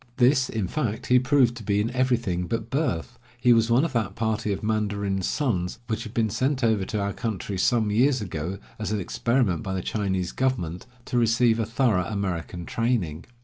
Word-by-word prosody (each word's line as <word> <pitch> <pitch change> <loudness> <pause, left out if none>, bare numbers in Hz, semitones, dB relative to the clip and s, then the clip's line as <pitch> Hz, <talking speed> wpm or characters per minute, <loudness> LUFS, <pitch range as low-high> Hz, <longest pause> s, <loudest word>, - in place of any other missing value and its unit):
This, 130 +1 +4
in 110 -5 -2
fact, 120 -3 -2
he 125 0 +5
proved 130 -2 +3
to 115 - -8
be 100 0 +1
in 110 +4 0
everything 120 -9 0
but 115 - -3
birth. 135 - -1 0.2
He 125 0 +5
was 115 0 +3
one 125 +6 +4
of 165 - -4
that 105 -5 -1
party 110 -1 -1
of 100 - -3
mandarins' 100 -3 -1
sons 100 -12 -1
which 110 -1 -2
had 110 - -7
been 110 -2 +1
sent 130 +3 0
over 110 -4 +2
to 105 - -3
our 100 0 -1
country 100 -4 -3
some 110 0 +2
years 130 +5 +3
ago, 90 -2 -4 0.2
as 110 - -3
an 105 - 0
experiment 115 +1 0
by 95 -4 -3
the 95 - -3
Chinese 95 -4 -1
government, 120 -8 -2 0.2
to 125 - 0
receive 115 0 +3
a 110 - 0
thorough 115 -6 +2
American 90 -4 -3
training. 105 -10 -1
110 Hz, 195 wpm, -25 LUFS, 95-120 Hz, 0.2 s, he